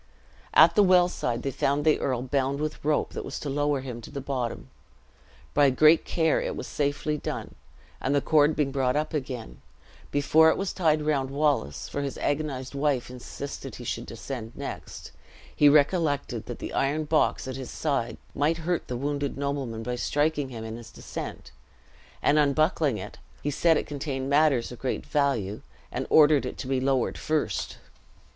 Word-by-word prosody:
At - - +8
the 210 - +5
well 180 -2 +6
side 120 -8 -3
they 135 - -1
found 140 +3 0
the 155 - +4
earl 125 -2 -1
bound 135 +1 0
with 155 0 -4
rope 150 0 +1
that - - -4
was - - -5
to 145 - -3
lower 145 -1 0
him 125 -3 -6
to - - -10
the 140 - -5
bottom. 130 -3 -3 0.9
By 145 -1 +5
great 155 +5 +5
care 160 -2 +1
it - - -3
was - - -5
safely 145 +1 -1
done; - - -5 0.5
and 140 - +1
the - - +4
cord 150 +1 +3
being 145 -3 0
brought 130 -1 +1
up 155 +2 -1
again, 125 - -5 0.5
before 155 +3 +5
it - - +1
was 195 -1 -2
tied 155 -4 +2
round 140 -3 0
Wallace 140 - 0
(for 145 - -3
his 140 -1 -4
agonized 145 -3 -2
wife 140 -3 0
insisted 130 0 -7
he 125 - -9
should 120 0 -4
descend 115 0 -6
next), - - -7 0.4
he 145 - +6
recollected 145 0 +2
that - - -5
the - - -6
iron 145 +3 +1
box 155 -3 +1
at 130 - -4
his 130 -2 -6
side 140 -6 -2 0.2
might 155 +3 +1
hurt 175 -1 -1
the 125 - -3
wounded 140 +1 -2
nobleman 140 -5 -3
by 125 +1 -2
striking 145 +1 0
him 115 -3 -7
in 110 0 -6
his 120 -1 -11
descent; - - -7 0.7
and, 150 +1 +4
unbuckling 150 - +2
it, 105 +1 -8 0.2
he 145 - 0
said 165 +2 +3
it - - -2
contained 135 -2 -4
matters 140 -5 +3
of 125 - -9
great 130 - -3
value, 130 -9 0 0.3
and - - -3
ordered 150 -2 +6
it - - -6
to - - -6
be 130 0 0
lowered 135 -2 0
first. 155 -1 -1
140 Hz, 180 wpm, -27 LUFS, 130-150 Hz, 0.9 s, At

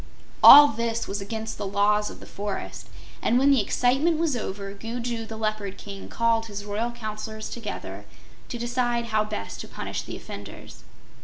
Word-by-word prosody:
All 290 0 +12
this 230 0 -2
was 200 +1 -3
against 220 +2 -5
the 205 - -3
Laws 210 +1 +2
of - - -11
the - - -11
Forest, 200 0 -6 0.3
and 240 - +2
when 275 +2 +5
the 270 -5 +5
excitement 270 +10 +2
was 320 -4 +1
over, 200 -3 -5
Gugu 230 +2 -4
the 220 - -7
Leopard 215 -3 -3
King 200 -1 -9
called 230 -1 +1
his 205 -1 -7
royal 210 +3 -2
Counselors 215 -1 -6
together 230 -3 -6 0.4
to 240 - -4
decide 240 0 -1
how 215 0 +3
best 215 0 -5
to - - -8
punish - - -5
the - - -7
offenders. - - -10
220 Hz, 170 wpm, -25 LUFS, 210-240 Hz, 0.4 s, All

